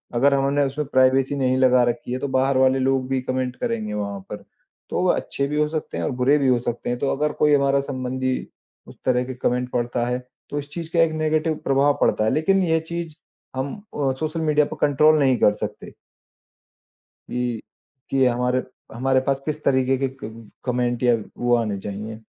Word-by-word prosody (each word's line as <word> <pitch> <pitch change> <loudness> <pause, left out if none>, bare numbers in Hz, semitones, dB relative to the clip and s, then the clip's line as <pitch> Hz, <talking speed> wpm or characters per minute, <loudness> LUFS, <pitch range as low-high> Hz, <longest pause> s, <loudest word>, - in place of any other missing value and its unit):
अगर 140 +4 +4
हमने 140 +1 +2
उसमें 140 +1 -3
प्राइवेसी 130 +1 +3
नहीं 130 -1 +1
लगा 130 -1 +5
रखी 120 +1 -4
है 130 - -2
तो 140 - -2
बाहर 130 0 +2
वाले 130 0 +4
लोग 130 0 +1
भी 135 - +1
कॉमेंट 130 0 -2
करेंगे 110 -2 -3
वहाँ 100 -1 -3
पर। - - -7 0.5
तो - - -1
वह 180 - +3
अच्छे 140 - -2
भी 150 +1 -1
हो 150 - +2
सकते 155 -1 -4
हैं - - -2
और - - -1
बुरे 140 +4 +5
भी 140 - +1
हो 125 -2 +4
सकते 120 0 -4
हैं। 120 0 -2
तो 140 - 0
अगर 150 +1 0
कोई 150 -1 +4
हमारा 140 0 +3
संबंधी 130 -1 -2 0.5
उस - - -12
तरह 125 -1 +2
के 130 - -6
कॉमेंट 125 0 -1
पढ़ता 120 0 -1
है 125 0 -1 0.3
तो 145 - -2
इस 145 - -8
चीज़ 165 -2 -6
का 170 - +2
एक 165 - +3
नेगेटिव 155 0 +1
प्रभाव 140 +1 +3
पड़ता 110 - +2
है। 110 - +2
लेकिन 190 +5 +2
ये 160 -1 +2
चीज़ 165 0 -5 0.4
हम 135 +1 -3 0.2
अ, 140 -2 +1
सोशल 160 +1 -2
मीडिया 150 -1 +3
पर - - -5
कंट्रोल 155 +2 +4
नहीं 130 -3 +3
कर 105 - +5
सकते। 105 - -9 1.4
कि 120 -2 -2 0.5
कि 135 -1 +3
हमारे 125 +1 +1 0.3
हमारे 130 +2 +2
पास 135 -1 +1
किस 150 0 -4
तरीके 130 -1 +2
के 135 +1 0 0.2
क 110 0 -9
कॉमेंट 125 -1 -1
या 120 -1 +5 0.2
वो 120 0 +2
आने 105 -4 -1
चाहिए। 110 +3 -7
130 Hz, 205 wpm, -23 LUFS, 125-145 Hz, 1.4 s, लगा